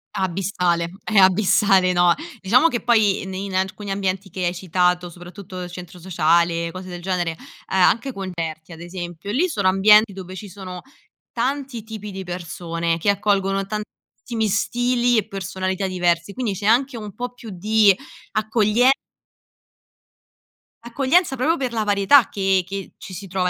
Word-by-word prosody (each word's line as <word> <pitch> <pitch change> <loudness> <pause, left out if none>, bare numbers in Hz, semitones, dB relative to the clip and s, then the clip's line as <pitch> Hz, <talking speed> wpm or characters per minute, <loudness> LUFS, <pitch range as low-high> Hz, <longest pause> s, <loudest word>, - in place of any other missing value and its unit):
Abissale, 180 -2 0
è 220 - -1
abissale, 190 0 +5
no. 175 -1 +4 0.3
Diciamo 240 +11 +4
che 245 -7 -2
poi 220 -5 +3
ne 190 0 -6
in 195 -1 -5
alcuni 190 +2 -2
ambienti 195 0 -2
che 185 0 -3
hai 175 - 0
citato, 180 0 0
soprattutto 180 +2 -10
il 175 - -8
centro 180 0 -10
sociale, 170 -1 +1
cose 185 +2 -8
del 175 -1 -7
genere, 180 -2 -1
uhm, 160 - -12 0.4
anche 230 +8 +3
concerti 170 -4 -5
ad 160 - -12
esempio, 175 +1 -7
lì 300 - +2
sono 320 - 0
ambienti 210 +2 +5
dove 185 -1 -8
ci 200 +1 -8
sono 185 -1 -8 0.5
tanti 260 -1 -2
tipi 215 -2 -8
di 190 0 -6
persone 170 -1 -3
che 205 - 0
accolgono 195 -1 +1
tantissimi 215 +2 -5
stili 245 +4 +1
e 215 -1 0
personalità 190 -1 -3
diversi. 175 0 0
Quindi 240 -4 -2
c'è 200 +2 -3
anche 255 +4 +3
un 210 -3 -7
po' 245 0 -5
più 240 -2 -11
di 205 +2 +3 0.4
accoglie 215 +3 +3 1.9
accoglienza 270 +4 +1
proprio 310 +7 +2
per 260 -6 -3
la 220 -2 -1
varietà 205 +4 +5
che 195 -2 +1
che 195 0 -7
ci 190 - -10
si 195 +2 -7
trova 180 0 0
195 Hz, 155 wpm, -22 LUFS, 180-220 Hz, 1.9 s, abissale